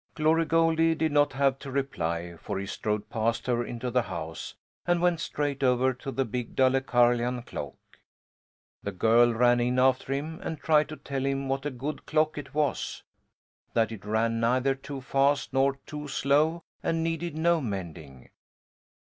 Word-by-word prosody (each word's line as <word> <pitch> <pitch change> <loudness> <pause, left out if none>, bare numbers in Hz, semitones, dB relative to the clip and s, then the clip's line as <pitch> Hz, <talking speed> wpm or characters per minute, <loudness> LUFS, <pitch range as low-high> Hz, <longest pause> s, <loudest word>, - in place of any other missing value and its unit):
Glory 160 +1 +3
Goldie 165 0 +3
did 160 -1 0
not 145 -2 +3
have 135 0 +1
to 140 - -8
reply, 85 -11 -2
for 100 +4 -5
he 100 - -3
strode 105 +1 -3
past 115 +1 0
her 120 -1 +1
into 120 +1 -4
the 125 +1 +3
house 80 -7 -6 0.3
and 175 0 +3
went 175 -1 +2
straight 145 -4 -2
over 130 0 +3
to 130 +3 -8
the 135 0 0
big 120 +1 -5
Dalecarlian 125 -2 +2
clock. 70 - -6 1.1
The 100 - -4
girl 115 +5 +4
ran 120 +1 +4
in 125 +1 +1
after 130 +1 +2
him 155 +4 -3
and 160 - -4
tried 155 -1 +3
to 155 - -6
tell 140 -2 -4
him 135 0 -1
what 135 +2 -1
a - - 0
good 140 +3 -6
clock 155 0 +2
it 145 0 -10
was, 150 -2 -1 0.7
that 115 -1 +2
it 110 -3 -8
ran 115 +2 0
neither 125 +4 +2
too 135 0 -8
fast 140 +2 +1
nor 135 +1 +3
too 150 -1 -6
slow 150 +4 +1 0.2
and 165 0 0
needed 165 -1 -2
no 170 0 +3
mending. 85 - -6
135 Hz, 170 wpm, -28 LUFS, 120-150 Hz, 1.1 s, girl